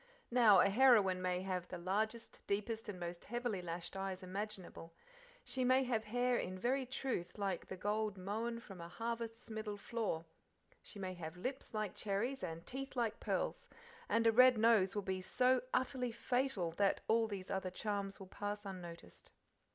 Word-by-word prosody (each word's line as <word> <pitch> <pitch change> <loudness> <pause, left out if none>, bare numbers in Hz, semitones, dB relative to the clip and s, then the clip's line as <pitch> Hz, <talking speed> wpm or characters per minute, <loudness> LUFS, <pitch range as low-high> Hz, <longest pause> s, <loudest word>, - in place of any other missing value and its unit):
Now 225 -6 +7
a 195 - +5
heroine 205 -5 +5
may 180 0 0
have 185 -2 -2
the 180 - -5
largest, 215 +6 -2
deepest, 220 +2 -1
and 190 -3 -5
most 175 0 -5
heavily 240 -4 -2
lashed 175 +1 -5
eyes 190 -1 -3
imaginable; 185 -3 -6 0.5
she 260 - -1
may 255 +1 +5
have 230 -3 0
hair 245 +3 +2
in 185 +1 -3
very 255 +6 0
truth 255 -9 -3
like 195 -4 -2
the 190 - -6
gold 210 +1 -1
"mown 220 +5 -2
from 195 -6 -10
a 170 - -6
harvest's 230 +2 -4
middle 215 -1 -4
floor"; 200 -6 -2 0.6
she - - -10
may 190 -2 -3
have 165 -1 -7
lips 255 +4 -4
like 215 -3 -1
cherries 225 +6 -1
and 165 -1 -5
teeth 270 +1 -5
like 230 -3 0
pearls, - - -2 0.4
and 230 0 +3
a 225 - +7
red 255 +1 +7
nose 215 -4 +4
will 205 - -1
be 190 -1 -2
so 250 +6 +3
utterly 255 -1 +1
fatal 245 -6 0
that 195 +4 +2
all 225 0 +4
these 195 -3 -5
other 190 -1 -1
charms 200 +1 -3
will 195 - -8
pass 205 +2 -4
unnoticed. 175 -3 -9
210 Hz, 175 wpm, -37 LUFS, 185-235 Hz, 0.6 s, Now